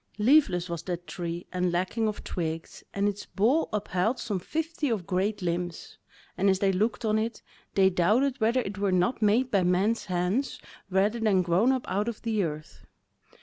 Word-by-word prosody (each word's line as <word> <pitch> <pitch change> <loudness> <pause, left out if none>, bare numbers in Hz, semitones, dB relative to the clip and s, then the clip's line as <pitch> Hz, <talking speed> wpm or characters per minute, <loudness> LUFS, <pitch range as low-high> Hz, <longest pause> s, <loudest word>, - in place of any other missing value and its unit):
Leafless 210 - +4
was 170 -2 -4
that 175 0 -5
tree 175 -2 -5
and 180 -1 0
lacking 185 +6 0
of 210 - -4
twigs, 165 -2 -4
and 200 +1 0
its 205 0 -4
bole 245 +11 +2
upheld 205 +2 0
but - - -13
some 200 -4 -2
fifty 315 - -2
of 210 -7 -1
great 200 +2 -1
limbs, 175 0 -4 0.4
and 195 +1 +2
as 190 - +3
they 195 0 +2
looked 215 +5 0
on 215 0 +2
it, 225 +1 -3 0.3
they 195 -1 +5
doubted 220 +9 +2
whether 235 +4 +3
it 200 -3 -6
were 200 -1 +1
not 185 +7 +1
made 230 +5 +3
by 195 - +3
men's 185 +6 +1
hands 185 +8 -1 0.3
rather 200 +5 +1
than 205 -5 +3
grown 180 +9 +3
up 260 -2 -2
out 205 +3 -1
of 235 -3 -3
the 220 -3 0
earth. 155 -2 -6
200 Hz, 190 wpm, -27 LUFS, 180-225 Hz, 0.4 s, they